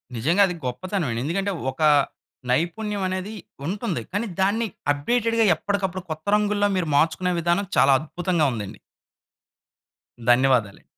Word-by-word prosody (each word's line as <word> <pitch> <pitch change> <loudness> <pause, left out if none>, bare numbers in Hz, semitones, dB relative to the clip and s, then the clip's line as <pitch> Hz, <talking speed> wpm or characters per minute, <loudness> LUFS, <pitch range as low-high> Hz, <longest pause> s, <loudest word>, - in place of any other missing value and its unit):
నిజంగా 160 - +2
అది 180 - -4
గొప్పతనమే. 165 - -2
ఎందుకంటే 195 +6 -1 0.2
ఒక 160 - -11 0.7
నైపుణ్యం 195 +9 -1
అనేది 185 +3 -4 0.3
ఉంటుంది. 190 - -2
కానీ 205 +4 -1
దాన్ని 215 +4 +1 0.2
అప్డేటెడ్‌గా 230 +9 +1
ఎప్పటికప్పుడు 190 0 -2
కొత్త 155 0 -6
రంగు‌‌ల్లో 210 -1 +2
మీరు 175 -3 -1
మార్చుకునే 165 +4 +2
విధానం 175 +4 +1
చాలా 135 0 +6
అద్భుతంగా 170 +1 -1
ఉందండి. 105 -5 -6 1.5
ధన్యవాదాలు. 120 -5 +3
180 Hz, 115 wpm, -23 LUFS, 150-205 Hz, 1.5 s, చాలా